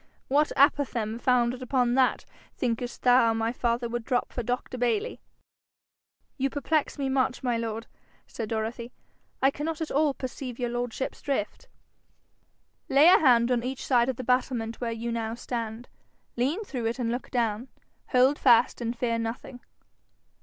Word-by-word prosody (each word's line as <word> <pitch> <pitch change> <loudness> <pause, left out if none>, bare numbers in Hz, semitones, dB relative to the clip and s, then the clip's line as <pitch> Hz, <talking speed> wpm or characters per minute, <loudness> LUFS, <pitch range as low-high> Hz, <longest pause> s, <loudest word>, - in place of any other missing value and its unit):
What 295 +3 +3
apophthegm 250 -6 +2
founded 250 0 +1
upon 250 -1 +1
that, 260 0 +2 0.3
thinkest 240 0 -3
thou, 245 -2 +5
my 225 +1 0
father 235 -1 -1
would 240 0 -4
drop 245 +1 -1
for 245 - -2
Dr 245 +2 -3
Bayly?' 240 -4 -1 1.2
'You 270 +1 +1
perplex 295 +2 -1
me 275 -1 -1
much, 265 0 0
my 245 -2 +1
lord,' 230 -1 -3 0.4
said 225 -2 -6
Dorothy. 230 +2 -3 0.5
'I 270 - +5
cannot 305 +3 -4
at 320 - -4
all 290 -1 +2
perceive 255 -1 -6
your 245 -2 -2
lordship's 245 +1 -3
drift.' 265 -7 -3 1.2
'Lay 275 +3 +6
a - - +7
hand 245 -4 +4
on 245 -1 +2
each 255 +2 -5
side 245 -1 +3
of 260 - -1
the 255 - -6
battlement 250 -2 -1
where 235 -1 -1
you 230 +1 -4
now 225 -1 -3
stand; 235 -1 -5 0.5
lean 280 - 0
through 250 - -3
it 230 - -2
and 235 -3 -1
look 245 +2 -4
down. 235 -1 -1 0.4
Hold 260 +3 +3
fast 240 -1 +4
and 235 0 -3
fear 230 -1 0
nothing.' 230 +2 -5
245 Hz, 160 wpm, -27 LUFS, 230-260 Hz, 1.2 s, a